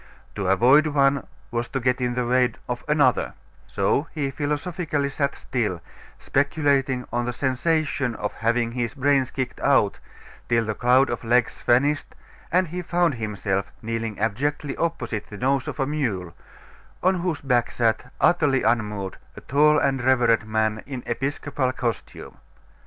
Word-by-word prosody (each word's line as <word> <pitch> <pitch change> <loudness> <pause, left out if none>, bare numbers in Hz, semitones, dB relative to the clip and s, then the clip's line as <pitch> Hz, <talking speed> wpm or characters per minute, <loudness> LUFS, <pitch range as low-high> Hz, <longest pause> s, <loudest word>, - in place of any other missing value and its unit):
To 100 -3 -3
avoid 130 +11 +5
one 140 -2 +2 0.2
was 120 0 -2
to 135 - -3
get 125 0 0
in 120 -1 0
the 125 -1 0
way 125 -1 +2
of 125 -1 -4
another; 145 -4 +2 0.3
so 145 - 0
he 140 -3 -1
philosophically 145 0 -2
sat 140 0 -1
still, 105 -8 -2 0.4
speculating 135 -3 +1
on 120 0 0
the 125 - -1
sensation 140 0 0
of 105 -1 -3
having 115 +1 0
his 120 +1 -3
brains 140 -1 +2
kicked 130 -2 -4
out, - - +2 0.5
till 115 -1 +2
the 110 - -1
cloud 125 +4 +3
of - - -4
legs 120 +1 +1
vanished, 145 +5 +1 0.4
and 180 -1 +2
he 180 +2 -4
found 175 -2 +1
himself 100 -4 -2
kneeling 115 -1 -3
abjectly 140 +7 -1
opposite 120 -11 -2
the 105 - -9
nose 135 +3 0
of - - -5
a 135 - +2
mule, 115 - -2 0.7
on 185 0 +3
whose 170 -4 -2
back 125 -4 +1
sat, 120 +2 0
utterly 145 -6 +3
unmoved, 105 -4 -1 0.2
a - - -8
tall 150 +2 +4
and 135 -2 +1
reverend 120 -4 +3
man, 110 0 0
in 130 -3 -6
episcopal 135 +1 -2
costume. 120 -3 -5
130 Hz, 150 wpm, -24 LUFS, 115-145 Hz, 0.7 s, avoid